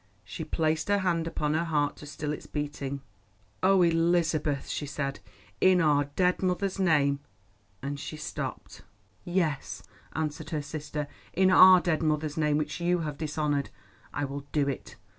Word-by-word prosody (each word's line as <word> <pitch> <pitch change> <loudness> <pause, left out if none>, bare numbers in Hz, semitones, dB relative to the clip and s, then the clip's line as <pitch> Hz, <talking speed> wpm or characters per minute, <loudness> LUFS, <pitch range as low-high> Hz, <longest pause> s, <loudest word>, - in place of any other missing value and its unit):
She 160 - -6
placed 155 0 0
her 205 0 +3
hand 170 -4 0
upon 150 -2 -1
her 160 +2 +1
heart 145 -3 0
to 150 - -10
still 150 0 -3
its - - -8
beating. 145 -2 -4 0.6
"Oh, 190 -1 +5
Elizabeth," 165 -3 +2
she 145 - -3
said, 140 -1 -3 0.4
"in 185 -1 +5
our 145 -3 +3
dead 180 -1 +2
mother's 190 +1 0
name——" 145 -6 +3 0.6
and 140 +1 -3
she 155 - -6
stopped. 150 - -6 0.4
"Yes," 175 -6 -1 0.3
answered 155 0 -3
her 150 -2 -2
sister, 150 0 -4 0.3
"in 190 +1 +4
our 185 0 +9
dead 170 -3 0
mother's 155 -1 0
name, 150 -2 +2
which 155 +3 -3
you 175 0 +2
have 150 -3 -4
dishonoured, 150 -2 -1 0.4
I 145 - -2
will 140 +1 -6
do 145 -2 +1
it. 140 - -4
155 Hz, 160 wpm, -28 LUFS, 145-170 Hz, 0.6 s, our